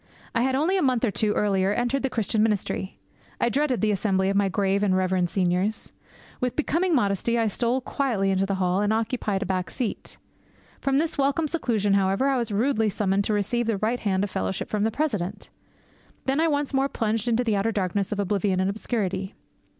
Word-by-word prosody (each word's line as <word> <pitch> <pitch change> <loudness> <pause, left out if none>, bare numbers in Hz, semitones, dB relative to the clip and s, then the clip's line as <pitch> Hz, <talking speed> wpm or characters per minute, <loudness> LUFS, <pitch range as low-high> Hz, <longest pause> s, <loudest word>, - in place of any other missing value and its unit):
I 230 - +1
had 260 +1 +1
only 330 +8 +2
a - - +1
month 255 -3 +2
or 220 - 0
two 210 +1 +1
earlier 195 -2 +1
entered 245 +5 0
the 270 - 0
Christian 220 -2 0
ministry. 210 -3 -1 0.4
I 240 - +2
dreaded 265 0 0
the 215 -1 +2
Assembly 195 -1 +1
of - - -2
my 200 -1 +3
grave 195 +2 +1
and 190 -2 +2
reverend 185 -1 +1
seniors. 185 +3 0 0.5
With 250 -2 -1
becoming 330 +3 +1
modesty, 220 0 +1
I 230 - +2
stole 240 +5 0
quietly 235 -8 0
into 195 0 +1
the 195 - 0
hall 185 +1 +1
and 205 0 +1
occupied 220 -3 -1
a - - -5
back 185 -1 -2
seat. 245 -5 -5 0.6
From 275 -1 +1
this 315 0 -1
welcome 280 +3 +2
seclusion, 225 - 0
however, 195 +7 +2
I 270 - +2
was 235 -3 -3
rudely 220 +1 +1
summoned 195 0 0
to 215 - 0
receive 220 +3 0
the 225 -3 +1
right 225 +5 0
hand 190 -2 0
of 205 - -3
fellowship 95 0 -3
from 210 0 +1
the - - +2
President. 215 - -3 0.7
Then 270 +2 +1
I 330 - +3
once 290 -2 -1
more 270 +1 +2
plunged 225 -1 -1
into 240 +1 +2
the 225 -3 +1
outer 200 +3 +1
darkness 200 -1 -1
of 210 - -2
oblivion 200 -1 0
and 190 +1 +1
obscurity. 195 -3 -3
215 Hz, 205 wpm, -25 LUFS, 195-250 Hz, 0.7 s, my